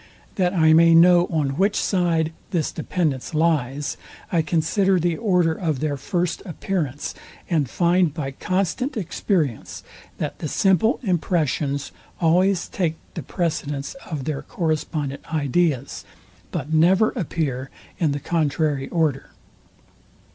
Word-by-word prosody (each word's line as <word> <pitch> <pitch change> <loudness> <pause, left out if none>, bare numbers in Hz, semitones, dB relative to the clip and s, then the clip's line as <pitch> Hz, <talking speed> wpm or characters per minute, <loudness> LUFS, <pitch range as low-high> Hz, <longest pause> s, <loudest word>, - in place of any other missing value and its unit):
That 180 -1 0
I 160 -2 +5
may 165 +1 +6
know 175 +1 +6
on 145 -4 -1
which 200 +2 +2
side 165 -4 +1 0.2
this 165 -5 -1
dependence 155 -4 -2
lies, 145 -3 0 0.3
I 170 - +3
consider 175 +4 +1
the 170 0 +1
order 180 -5 +2
of 160 -5 -2
their 150 0 -1
first 170 +4 -2
appearance; 160 -6 -3 0.4
and 150 -7 +1
find 175 +3 +2
by 140 -3 -4
constant 195 - -1
experience, 170 - -2 0.3
that - - -4
the 155 - -3
simple 195 - +2
impressions 155 - 0 0.3
always 180 +2 +3
take 170 -5 -1 0.2
the 165 - -5
precedence 145 -2 -3 0.2
of 150 -5 -4
their 150 0 -3
correspondent 155 - -2
ideas, 145 -2 0 0.5
but 155 -2 -4
never 185 +7 +4
appear 135 -6 -3 0.3
in 160 -4 +2
the 145 - -2
contrary 150 -3 0
order. 155 -5 0
160 Hz, 125 wpm, -23 LUFS, 145-180 Hz, 0.5 s, may